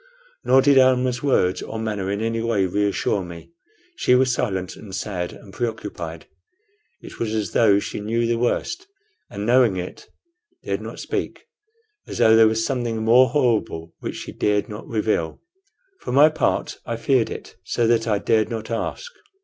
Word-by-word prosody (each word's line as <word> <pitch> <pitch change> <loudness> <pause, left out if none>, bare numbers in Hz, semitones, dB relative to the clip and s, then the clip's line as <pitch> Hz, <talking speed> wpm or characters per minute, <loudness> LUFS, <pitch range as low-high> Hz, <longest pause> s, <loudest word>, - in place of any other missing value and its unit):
Nor 130 0 +5
did 140 -1 +6
Almah's 130 -1 +3
words 95 -10 +1
or 110 - -6
manner 105 -4 -3
in 100 +1 -2
any 115 0 -1
way 115 -4 +1
reassure 100 +1 0
me. 85 - -10 0.5
She 125 - +3
was 130 0 +3
silent 95 -7 -2
and 95 -3 -9
sad 90 -4 -3
and 95 - -14
preoccupied. 95 -8 -5 0.8
It - - -12
was 110 -1 -2
as 110 -2 -2
though 105 -4 +4
she 100 - -4
knew 115 +3 -1
the 115 0 0
worst, 345 - -1 0.4
and 100 +1 -5
knowing 120 -4 +4
it, 90 0 -7 0.6
dared - - -2
not - - -8
speak; - - -4 0.6
as - - -6
though 110 0 +6
there 110 0 +7
was 110 +1 0
something 120 -4 -2
more 125 +3 +6
horrible 115 - 0
which - - -5
she - - -7
dared 105 -1 0
not 105 +1 -9
reveal. 105 -7 -1 0.6
For - - -6
my 145 +4 +7
part, 155 - -1
I 115 - -3
feared 115 +1 +1
it - - -9
so 115 +5 0
that 115 0 +2
I 105 -2 +2
dared 110 +1 +1
not 110 -1 -5
ask. 115 - -3
110 Hz, 175 wpm, -22 LUFS, 100-120 Hz, 0.8 s, there